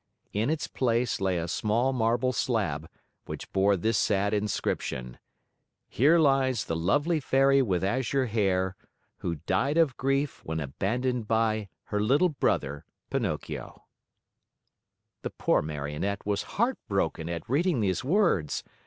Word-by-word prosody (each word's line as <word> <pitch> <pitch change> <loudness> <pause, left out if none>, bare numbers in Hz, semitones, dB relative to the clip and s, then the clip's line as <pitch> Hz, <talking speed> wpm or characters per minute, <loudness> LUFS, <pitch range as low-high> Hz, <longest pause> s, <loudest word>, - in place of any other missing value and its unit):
In 110 +5 0
its 155 -1 -1
place 120 -3 0
lay 95 -2 +1
a 85 0 -2
small 115 +9 +1
marble 120 +2 +1
slab, 95 - -1 0.4
which - - -8
bore 100 +1 +3
this 110 +4 +1
sad 100 0 +1
inscription: 65 - -2 0.7
HERE 155 +8 +4
LIES 135 -6 +3
THE 80 - -2
LOVELY 145 - +1
FAIRY 135 0 +4
WITH 95 -8 0
AZURE 130 +5 +1
HAIR 95 -4 0 0.4
WHO 85 - -3
DIED 95 - 0
OF 155 -6 +3
GRIEF 135 +2 0
WHEN 80 0 -3
ABANDONED 110 - -2
BY 110 -2 +1
HER 105 -1 -2
LITTLE 140 +12 +3
BROTHER 75 - -1 0.3
PINOCCHIO - - -3 1.4
The - - -3
poor - - +1
Marionette 75 +6 -3
was 100 0 0 0.2
heartbroken 95 - 0
at 85 -1 -5
reading 150 +1 +1
these 95 -3 0
words. 145 - +1
110 Hz, 130 wpm, -28 LUFS, 95-135 Hz, 1.4 s, HERE